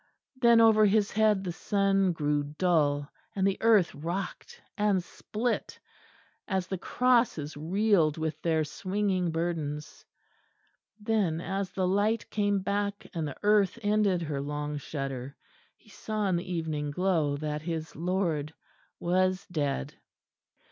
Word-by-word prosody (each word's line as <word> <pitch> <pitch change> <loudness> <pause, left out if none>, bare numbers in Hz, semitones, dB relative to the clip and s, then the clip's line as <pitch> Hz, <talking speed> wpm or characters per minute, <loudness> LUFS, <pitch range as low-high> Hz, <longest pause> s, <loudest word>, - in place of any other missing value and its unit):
Then 235 -2 +5
over 220 -1 +6
his 210 0 +2
head 215 -2 +3
the 180 - -3
sun 195 +1 +1
grew 150 -3 0
dull, 145 -2 +1 0.3
and 190 -1 +1
the 195 0 +1
earth 220 -6 +4
rocked 170 +6 -5 0.2
and 205 -3 +1
split, 225 +6 -3 0.7
as 190 -3 0
the 190 -1 -4
crosses 235 - +1
reeled 170 0 +2
with 155 -1 -3
their 160 -2 +1
swinging 185 +3 -1
burdens. 160 -3 -3 1.0
Then, 205 -7 0
as 195 +2 -3
the 185 -1 -1
light 205 +3 +1
came 205 -2 +1
back, 200 +1 -2
and 165 -4 -2
the 145 - -7
earth 205 -1 +3
ended 205 -4 +2
her 145 -3 -3
long 150 +1 -3
shudder, 135 -2 -5 0.4
he - - -24
saw 215 -1 -2
in 185 - +2
the 175 +1 -3
evening 155 -4 -2
glow 160 -3 +1
that 150 0 -3
his 160 -2 -4
Lord 165 -3 -1 0.4
was 185 +2 +1
dead. 145 - -2
180 Hz, 135 wpm, -29 LUFS, 155-205 Hz, 1.0 s, over